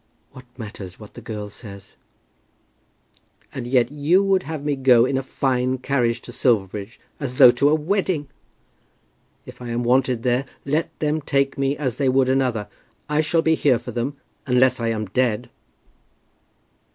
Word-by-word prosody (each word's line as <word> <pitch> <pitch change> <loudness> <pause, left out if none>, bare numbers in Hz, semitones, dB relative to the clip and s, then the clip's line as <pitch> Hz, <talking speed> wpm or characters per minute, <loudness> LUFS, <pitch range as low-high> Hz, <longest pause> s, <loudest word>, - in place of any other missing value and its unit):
"What 130 -2 -13
matters 100 -5 -9
what 105 -2 -13
the - - -10
girl 105 -2 -6
says?" 100 -2 -11 1.6
"And 120 - -5
yet 125 0 +2
you 150 +7 +2
would 195 -1 +2
have 155 -3 -6
me 145 -1 +1
go 125 -3 +5
in 135 - -1
a 135 - +1
fine 130 -1 -1
carriage 120 -3 0
to - - -10
Silverbridge, 105 -2 -1 0.2
as 130 -4 -4
though 125 - +9
to 140 +4 +2
a 155 - +4
wedding. 165 -2 -1 1.2
If - - -12
I 120 - -6
am 120 +1 -1
wanted 125 -1 +2
there 125 +2 +1 0.2
let 150 +4 0
them 155 +1 -1
take 140 -1 0
me 135 +1 0
as 130 -6 -2
they 140 -2 +1
would 130 0 +3
another. 125 -6 0 0.4
I 150 0 +1
shall 160 +2 +1
be 160 - +3
here 145 -5 +3
for 120 - -8
them, 130 +4 -3 0.3
unless 130 0 +3
I 115 - -1
am 110 -1 -1
dead." 110 +2 -1
130 Hz, 165 wpm, -22 LUFS, 120-145 Hz, 1.6 s, though